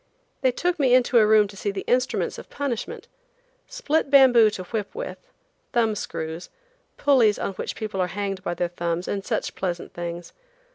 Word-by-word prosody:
They 260 - +3
took 350 +6 -1
me 255 -3 +5
into 250 -1 +4
a 215 - +5
room 215 -1 +5
to 200 - -13
see 205 - -3
the 195 -1 -4
instruments 255 +1 0
of - - -12
punishment. 270 -5 -4 0.6
Split 320 - -1
bamboo 255 -5 +7
to 200 -3 -6
whip 210 - -5
with, - - -5 0.5
thumb 225 -2 +2
screws, 160 -4 -5 0.5
pulleys 250 -7 +4
on 195 - -3
which - - -5
people 215 -4 -3
are 180 - +1
hanged 195 0 -4
by 175 -2 -3
their 175 0 -1
thumbs, 170 0 -3
and 200 -1 -2
such - - -2
pleasant 175 -2 -4
things. 175 0 -6
210 Hz, 180 wpm, -24 LUFS, 185-255 Hz, 0.6 s, bamboo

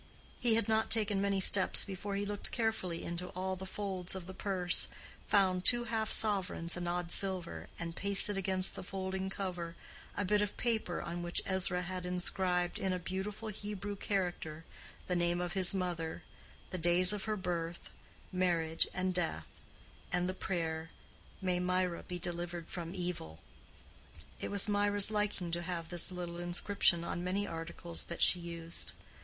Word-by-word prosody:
He 235 -3 +3
had 225 -2 +1
not 220 0 +2
taken 210 -3 +3
many 200 -1 +1
steps 190 0 +5
before 200 +1 -4
he 200 +1 -1
looked 205 0 -4
carefully 220 -7 -1
into 175 +1 -4
all 190 +1 -1
the 190 +1 -7
folds 190 -2 -3
of 185 -2 -6
the 190 - -8
purse, 185 -3 +3 0.4
found 185 -3 +3
two 240 +2 +4
half 225 -2 -1
sovereigns 190 -5 +4
and 175 -1 -3
odd 175 -1 -2
silver, 185 -3 +1
and, 165 -1 -5
pasted 200 +1 +5
against 190 -1 +1
the - - -5
folding 190 0 -3
cover, 180 -4 -4 0.4
a 205 - 0
bit 210 +2 +3
of 205 -1 -2
paper 220 -7 -1
on 170 +1 -4
which 175 0 -1
Ezra 185 -1 0
had 185 0 -4
inscribed, 180 0 0
in 190 -1 0
a - - 0
beautiful 195 +5 -4
Hebrew 205 -1 -5
character, 175 -6 -2 0.4
the 180 - -1
name 175 0 +1
of 175 0 -2
his 190 0 +7
mother, 175 -3 -3 0.5
the 185 - -3
days 175 +3 +6
of 205 -2 -4
her 215 -1 -1
birth, 175 -2 -3 0.4
marriage, 170 -3 +1
and 185 0 0
death, 165 - -1 0.7
and 180 0 +1
the 185 - -1
prayer, 165 -4 -3 0.5
"May 180 -1 +1
Mirah 180 -1 0
be 180 - -4
delivered 175 0 -4
from 170 0 -5
evil." 175 - -4 1.0
It - - -4
was 200 0 +5
Mirah's 205 0 +4
liking 210 -4 -1
to 170 +1 -1
have 170 -1 -4
this 175 +1 0
little 175 -1 -5
inscription 175 0 +1
on 175 +1 -3
many 195 +3 0
articles 165 0 -4
that 170 - -1
she 180 - +6
used. 170 -1 -5
185 Hz, 165 wpm, -34 LUFS, 175-200 Hz, 1.0 s, his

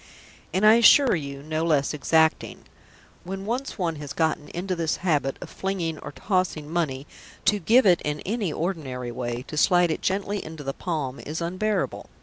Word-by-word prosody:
And, 190 +5 +1
I 215 +2 +8
assure 255 +3 +7
you, 140 -3 -6
no 155 +1 -2
less 150 -4 +1
exacting. 160 +2 +1 0.6
When 195 +2 -6
once 250 +5 -3
one 170 -5 -1
has 145 -1 -7
got 160 -1 +1
into 185 +2 -3
this 165 -2 0
habit 145 -6 +1
of - - -8
"flinging" 175 -5 -3
or - - -8
"tossing" 185 -3 -1
money, 150 -5 -2 0.4
to 205 +1 +3
give 230 +8 +4
it 180 -3 +5
in 150 0 -2
any 210 -4 -2
ordinary 140 -8 -3
way, 120 0 -4
to 150 - -8
slide 175 +1 +4
it - - -3
gently 200 +1 -1
into 155 -1 -8
the 135 0 -3
palm, 150 -7 -3
is 155 +2 -5
unbearable. 185 +5 -2
165 Hz, 175 wpm, -25 LUFS, 150-190 Hz, 0.6 s, I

